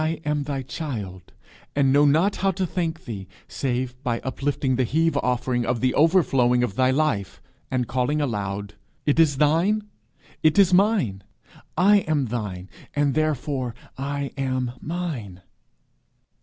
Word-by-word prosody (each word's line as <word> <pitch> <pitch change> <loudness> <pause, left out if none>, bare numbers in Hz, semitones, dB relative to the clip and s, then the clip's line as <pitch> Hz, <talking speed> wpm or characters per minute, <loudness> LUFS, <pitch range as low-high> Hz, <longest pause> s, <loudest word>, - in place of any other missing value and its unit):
I 160 0 -1
am 150 -1 0
thy 135 -2 -3
child, 110 - -6 0.4
and 135 -2 +3
know 145 +1 +5
not 160 +8 +3
how 195 - +1
to 190 0 -1
thank 165 -2 -3
thee 100 -5 -6 0.2
save 125 -1 -2
by 120 -4 -1
uplifting 135 0 -1
the 130 - +2
heave 160 +6 +1
offering 125 0 0
of 120 0 -1
the 130 +1 +1
overflowing 135 -7 +3
of 120 - -1
thy 130 +5 +2
life, 130 -8 0 0.3
and 125 -2 -1
calling 130 +4 0
aloud, 100 -6 -3 0.3
'It 150 +2 +2
is 150 -4 +4
thine: 165 +9 +2 0.6
it 155 +2 +3
is 195 -3 +5
mine. 180 - +2 0.5
I 205 +3 +6
am 155 -7 0
thine, 105 -6 -4 0.3
and 145 -1 +2
therefore 140 -5 -1 0.2
I 140 +1 -3
am 130 -2 -1
mine.'" 145 - -5
135 Hz, 145 wpm, -24 LUFS, 120-155 Hz, 0.6 s, I